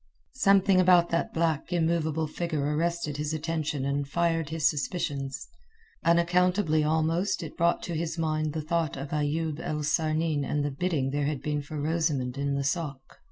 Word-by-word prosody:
Something 195 -5 +4
about 180 -2 +5
that 170 - 0
black 165 -1 0
immovable 160 -2 +1
figure 150 -2 -2
arrested 170 -2 -1
his 150 +1 -2
attention 155 -3 -2
and 140 0 -1
fired 165 0 0
his 160 -2 +2
suspicions. 140 -4 -2 0.6
Unaccountably 170 -1 +3
almost 165 +5 +1
it 155 - -8
brought 170 +1 +1
to 175 - -4
his 165 +1 -2
mind 155 -2 -1
the 155 -1 -3
thought 165 -2 -1
of 140 +1 -6
Ayoub 150 +1 -1
el 150 -2 -3
Sarnin 155 0 +1
and 145 +1 -1
the 145 - -1
bidding 140 -3 -1
there 145 0 0
had 145 -2 -2
been 150 -1 -1
for 145 +1 -6
Rosamund 150 -5 0
in 140 0 -1
the 140 - 0
sôk. 140 0 -1
155 Hz, 165 wpm, -28 LUFS, 145-170 Hz, 0.6 s, about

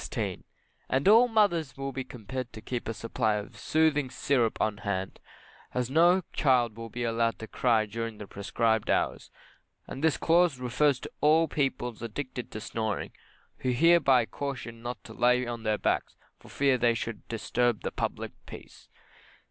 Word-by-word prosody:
And 135 +6 +1
all 230 +4 +7
mothers 200 - +1
will 135 0 -3
be 130 0 -4
compelled 125 +1 -6
to 110 - -9
keep 120 -4 -4
a 115 - -2
supply 110 -1 0
of 105 0 -6
soothing 155 -4 +2
syrup 125 -2 0
on 110 -1 0
hand, 95 -3 -3 0.6
as 125 0 -1
no 175 +5 +5
child 125 -6 +2
will 115 0 -7
be 120 +2 -4
allowed 115 0 0
to 110 - -7
cry 115 -3 +2
during 115 +1 -5
the 105 - -8
prescribed 110 +3 -1
hours; - - 0 0.6
and 135 - -7
this 160 -2 +3
Clause 170 -3 +3
refers 125 +2 +2
to - - -8
all 160 +2 +5
persons 125 -6 -2
addicted 125 +2 -5
to 110 - -6
snoring, 110 -1 -3 0.5
who 130 - -2
are - - +2
hereby 140 -4 +5
cautioned 120 -4 -6
not 120 -3 -6
to 110 - -11
lay 125 +2 +3
on 120 -1 -5
their 110 -1 0
backs, - - -1 0.2
for - - -16
fear 135 -2 +2
they 120 -1 +3
should 115 -2 -5
disturb 115 +1 0
the - - -3
public - - -3 0.2
peace. - - -12
125 Hz, 170 wpm, -28 LUFS, 115-140 Hz, 0.6 s, all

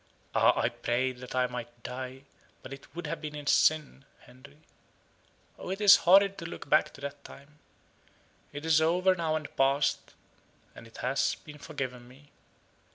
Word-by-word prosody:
Ah! - - +4
I - - +2
prayed 125 +1 -2
that 125 0 -8
I 130 0 +2
might 120 -1 -8
die, 130 +1 -7 0.4
but 130 - -8
it 135 +3 -14
would 175 -1 -6
have 155 +1 -4
been 150 -1 -6
in 145 -1 -7
sin, 150 -2 +2 0.2
Henry. 140 +5 -18 1.0
Oh, - - -7
it 190 +2 -3
is 205 -2 +8
horrid 195 +2 +4
to 165 - -7
look 170 - -9
back 155 +2 +3
to 140 - -14
that 140 0 -7
time. 145 +2 -15 0.9
It 145 +2 -8
is 160 -1 +4
over 180 +4 +3
now 165 -3 -1
and 155 -2 -6
past, 135 +1 +1 0.6
and 115 - -13
it 115 - -16
has 130 +2 +1
been 150 -1 -14
forgiven 130 -5 -6
me. 140 +4 -19
145 Hz, 170 wpm, -29 LUFS, 130-155 Hz, 1.0 s, is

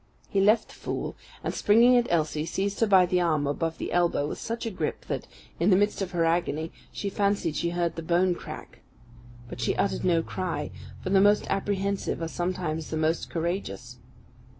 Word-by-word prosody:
He 195 - +2
left 215 +3 +4
the - - -13
fool, - - -4 0.3
and, - - -2
springing 235 +4 +5
at 240 -1 +3
Elsie, 155 -2 0
seized 195 +2 -2
her 225 - +3
by 190 -3 +6
the 180 0 +1
arm 155 -4 +1
above 160 +3 -1
the - - -4
elbow 175 -4 +2
with 150 - -5
such 230 +1 -4
a 225 - -2
grip 165 -5 -3
that, - - -4 0.3
in 170 +4 +3
the 190 - +6
midst 205 +1 +1
of 190 - -1
her 170 -2 +1
agony, 165 -1 0 0.2
she 205 - -4
fancied 200 -5 0
she 170 - 0
heard 170 -1 -1
the 165 - -4
bone 175 +2 +2
crack. - - -9 0.7
But 120 - -7
she 115 - +1
uttered 200 - 0
no 170 -2 +3
cry, 185 +1 -3 0.3
for 185 - -3
the 195 -1 +5
most 205 +1 +4
apprehensive 200 0 -1
are 165 - -2
sometimes 175 -2 -3
the 160 - -2
most 160 +1 0
courageous. 170 - -4
175 Hz, 195 wpm, -27 LUFS, 165-200 Hz, 0.7 s, by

